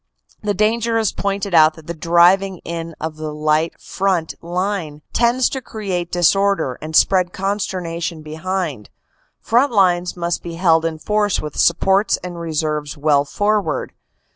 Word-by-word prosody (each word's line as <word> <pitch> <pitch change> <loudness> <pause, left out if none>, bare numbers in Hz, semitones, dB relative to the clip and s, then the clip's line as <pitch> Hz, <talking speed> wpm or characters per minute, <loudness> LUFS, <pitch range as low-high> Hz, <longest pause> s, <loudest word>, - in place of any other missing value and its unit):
The 205 -1 -1
danger 225 +3 +1
is 220 -3 +1
pointed 200 -1 -3
out 155 -1 +6
that 160 - -14
the 170 - -4
driving 175 +4 +3
in 165 -1 -5
of 155 0 -5
the 155 -1 -5
light 155 +2 0
front 185 -4 -1
line 175 -3 -3
tends 240 +2 +3
to 265 - -4
create 190 -7 -4
disorder 180 -5 +2
and 155 +1 -5
spread 185 0 +3
consternation 175 -5 -3
behind. 155 - -4 0.5
Front 245 +5 +2
lines 180 -4 +2
must 170 0 -2
be 170 -1 -7
held 165 -2 +3
in 165 -1 -2
force 210 +3 0
with 150 -2 -6
supports 195 +4 +3
and 175 -1 -6
reserves 155 -3 -2
well 145 -1 +2
forward. 205 +6 -1
175 Hz, 145 wpm, -19 LUFS, 160-195 Hz, 0.5 s, out